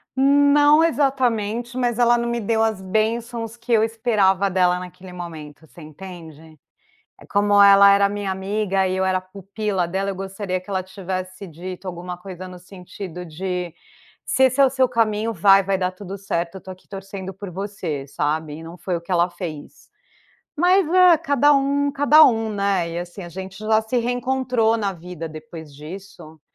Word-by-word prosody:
Não 285 Hz, +3 st, +5 dB
exatamente, 245 Hz, -5 st, 0 dB
mas 245 Hz, -2 st, 0 dB
ela 240 Hz, 0 st, +4 dB
não 235 Hz, 0 st, -2 dB
me 235 Hz, 0 st, -1 dB
deu 225 Hz, +1 st, +1 dB
as 220 Hz, -4 st, -1 dB
bênçãos 225 Hz, +3 st, -2 dB
que 235 Hz, +1 st, -8 dB
eu 220 Hz, -1 st, +4 dB
esperava 205 Hz, -4 st, +1 dB
dela 180 Hz, -1 st, +2 dB
naquele 180 Hz, 0 st, -11 dB
momento, 160 Hz, -3 st, -9 dB
você 170 Hz, -, -15 dB
entende? 160 Hz, -1 st, -12 dB, 0.6 s
Eh, -, -, -15 dB
como 205 Hz, 0 st, +4 dB
ela 200 Hz, 0 st, +8 dB
era 200 Hz, 0 st, +4 dB
a -, -, 0 dB
minha 205 Hz, -1 st, -3 dB
amiga 195 Hz, 0 st, -1 dB
e 185 Hz, -, -2 dB
eu 190 Hz, -, 0 dB
era 185 Hz, 0 st, +1 dB
a -, -, -7 dB
pupila 195 Hz, 0 st, -3 dB
dela, 195 Hz, +3 st, -2 dB
eu 190 Hz, -, -6 dB
gostaria 190 Hz, -1 st, -4 dB
que 185 Hz, -, -23 dB
ela 190 Hz, -2 st, -1 dB
tivesse 185 Hz, 0 st, -6 dB
dito 180 Hz, +3 st, -9 dB
alguma 180 Hz, 0 st, -6 dB
coisa 185 Hz, 0 st, -9 dB
no 180 Hz, -1 st, -10 dB
sentido 180 Hz, -1 st, -9 dB
de: 180 Hz, +1 st, -4 dB, 0.5 s
"Se 265 Hz, -, +2 dB
esse 260 Hz, +2 st, +2 dB
é -, -, +8 dB
o 265 Hz, -, +3 dB
seu 260 Hz, -1 st, +2 dB
caminho, 225 Hz, -1 st, 0 dB
vai, 195 Hz, +1 st, +5 dB
vai 195 Hz, 0 st, -1 dB
dar 185 Hz, 0 st, -1 dB
tudo 195 Hz, +1 st, -8 dB
certo, 175 Hz, -2 st, -3 dB
eu -, -, -8 dB
tô 190 Hz, -, -11 dB
aqui 185 Hz, -, -18 dB
torcendo 195 Hz, -1 st, -7 dB
por 195 Hz, +1 st, -9 dB
você", 180 Hz, -6 st, -5 dB
sabe, 150 Hz, +1 st, -2 dB
e 160 Hz, -, -9 dB
não 165 Hz, +2 st, -10 dB
foi 180 Hz, -1 st, -3 dB
o -, -, -5 dB
que 170 Hz, +2 st, -7 dB
ela 175 Hz, +1 st, +2 dB
fez. 160 Hz, -6 st, -8 dB, 0.7 s
Mas 360 Hz, +3 st, +3 dB
é, 365 Hz, -2 st, +7 dB
cada 290 Hz, -2 st, +3 dB
um 280 Hz, +1 st, +1 dB
cada 290 Hz, +2 st, +6 dB
um, 225 Hz, -2 st, +1 dB
né, 200 Hz, -4 st, 0 dB
e 170 Hz, -, -3 dB
assim, 175 Hz, +2 st, -8 dB
a 175 Hz, -, -8 dB
gente 190 Hz, +2 st, -8 dB
já 220 Hz, 0 st, +2 dB
se 220 Hz, +3 st, -2 dB
reencontrou 245 Hz, -1 st, 0 dB
na 205 Hz, -3 st, -1 dB
vida 175 Hz, -2 st, -8 dB
depois 155 Hz, -1 st, -10 dB
disso, 155 Hz, 0 st, -11 dB
195 Hz, 190 wpm, -22 LUFS, 180-230 Hz, 0.7 s, ela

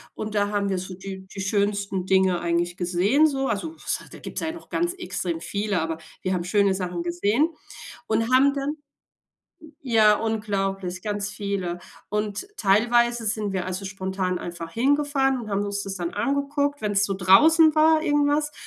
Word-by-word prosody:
und 215 Hz, 0 st, -5 dB
da 205 Hz, -1 st, +2 dB
haben 205 Hz, -1 st, -1 dB
wir 190 Hz, -2 st, -1 dB
so 185 Hz, 0 st, -7 dB
die 190 Hz, 0 st, -8 dB
die 195 Hz, -, -7 dB
schönsten 200 Hz, -1 st, -1 dB
Dinge 190 Hz, -2 st, +3 dB
eigentlich 175 Hz, 0 st, 0 dB
gesehen, 190 Hz, -, +3 dB
so. 270 Hz, -2 st, -1 dB
Also, 250 Hz, +9 st, -3 dB
was -, -, -2 dB
hei -, -, -13 dB
da -, -, -10 dB
gibt -, -, -6 dB
es -, -, -2 dB
ja 320 Hz, -, -1 dB
noch 330 Hz, 0 st, -12 dB
ganz 345 Hz, +2 st, -1 dB
extrem 180 Hz, -, -3 dB
viele, 200 Hz, +1 st, -2 dB
aber 160 Hz, 0 st, -3 dB, 0.2 s
wir 185 Hz, -, 0 dB
haben 175 Hz, -2 st, -1 dB
schöne 200 Hz, 0 st, +3 dB
Sachen 180 Hz, -2 st, -3 dB
gesehen 205 Hz, -, +1 dB, 0.6 s
und 225 Hz, +3 st, 0 dB
haben 275 Hz, +2 st, +5 dB
dann 280 Hz, +2 st, -2 dB, 0.8 s
j 315 Hz, -1 st, -14 dB
ja, 220 Hz, -4 st, +5 dB
unglaublich, 195 Hz, -4 st, -2 dB
ganz 205 Hz, -1 st, -2 dB
viele. 200 Hz, -4 st, -3 dB, 0.3 s
Und 210 Hz, -, -2 dB
teilweise 235 Hz, +3 st, +2 dB
sind 210 Hz, -1 st, -1 dB
wir, 185 Hz, -1 st, -2 dB
also, 185 Hz, +2 st, -4 dB
spontan 190 Hz, -1 st, -2 dB
einfach 170 Hz, -1 st, -7 dB
hingefahren 270 Hz, -, +1 dB
und 215 Hz, -, -8 dB
haben 200 Hz, +1 st, 0 dB
uns 200 Hz, 0 st, -2 dB
das 195 Hz, 0 st, -5 dB
dann 175 Hz, -1 st, -4 dB
angeguckt, 280 Hz, +4 st, -1 dB
wenn 210 Hz, -1 st, -1 dB
es 200 Hz, 0 st, +3 dB
so 195 Hz, -, -1 dB
draußen 305 Hz, -, +6 dB
war 315 Hz, 0 st, +5 dB
irgendwas. 295 Hz, 0 st, +1 dB
205 Hz, 185 wpm, -24 LUFS, 190-270 Hz, 0.8 s, draußen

